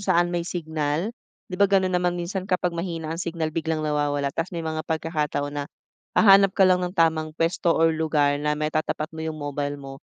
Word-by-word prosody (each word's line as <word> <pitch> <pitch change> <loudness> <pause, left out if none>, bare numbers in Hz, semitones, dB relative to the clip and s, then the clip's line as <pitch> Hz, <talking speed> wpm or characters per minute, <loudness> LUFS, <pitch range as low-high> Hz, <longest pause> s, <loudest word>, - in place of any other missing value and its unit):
saan 175 -3 +2
may 175 - 0
signal. 160 +2 -2 0.4
'Di 180 - -5
ba, 200 - +6
gano'n 190 -1 +2
naman 180 0 +1
minsan 185 +2 -4
kapag 180 -1 0
mahina 165 -2 -4
ang 165 - -5
signal 165 -3 -3
biglang 160 -1 -2
nawawala 145 -2 0
tas 165 +4 -2
may 165 - -4
mga 160 0 -2
pagkakataon 150 -3 -2
na, 145 -1 -3 0.5
hahanap 195 -2 +6
ka 195 - +6
lang 185 -1 +4
ng 180 +1 -4
tamang 160 -2 +1
puwesto 165 +1 +1
or 165 0 +4
lugar 150 -3 +1
na 150 0 0
matatapat 155 0 -2
mo 160 - -7
'yong 160 -1 -4
mobile 145 -1 -3
mo, 135 -1 -9
160 Hz, 195 wpm, -24 LUFS, 150-175 Hz, 0.5 s, ba